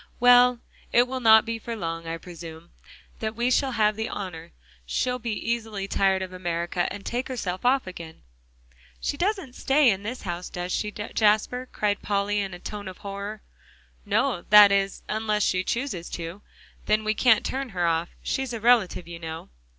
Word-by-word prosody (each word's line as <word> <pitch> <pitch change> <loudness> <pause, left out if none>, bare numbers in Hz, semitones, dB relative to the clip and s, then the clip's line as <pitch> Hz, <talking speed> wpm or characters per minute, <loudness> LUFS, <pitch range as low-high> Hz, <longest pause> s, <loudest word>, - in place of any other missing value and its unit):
"Well, 245 0 +6 0.3
it 245 +1 +4
will 260 +1 -3
not 220 -2 +7
be 230 0 -3
for 230 +1 -5
long, 165 -4 -4
I 165 0 -3
presume, 165 -1 -11 0.5
that 220 0 -3
we 240 +2 0
shall 265 0 +2
have 215 -2 +2
the 220 +1 -3
honor; 170 -4 -6 0.3
she'll 250 - -1
be 230 -2 -3 0.2
easily 220 -4 -3
tired 190 -1 +2
of 185 -1 -7
America, 175 0 -2
and 200 0 -8
take 245 +2 -2
herself 190 -8 -4
off 265 +1 +3
again." 170 -3 -9 0.8
"She - - -2
doesn't 370 - -1
stay 270 -1 +4
in 195 -1 -2
this 230 +5 -6
house, 175 -2 -4
does 180 0 -5
she, 210 - -1
Jasper?" 215 +4 0
cried 205 -1 -1
Polly 205 0 0
in 195 -2 -3
a - - -11
tone 205 +1 -7
of 185 - -8
horror. 200 +1 -6 0.6
"No; 175 - +1
that 205 -1 +9
is, 195 0 0
unless 215 -1 0
she 185 0 +1
chooses 235 -7 -3
to, 170 +4 -6 0.5
then 215 0 +2
we 215 0 +1
can't 225 -1 +4
turn 270 0 -3
her 180 -4 -1
off. 165 0 +1
She's 265 -2 -2
a 230 - -3
relative, 220 -7 +3
you 170 -1 -8
know." 160 -1 -7
210 Hz, 180 wpm, -25 LUFS, 180-235 Hz, 0.8 s, that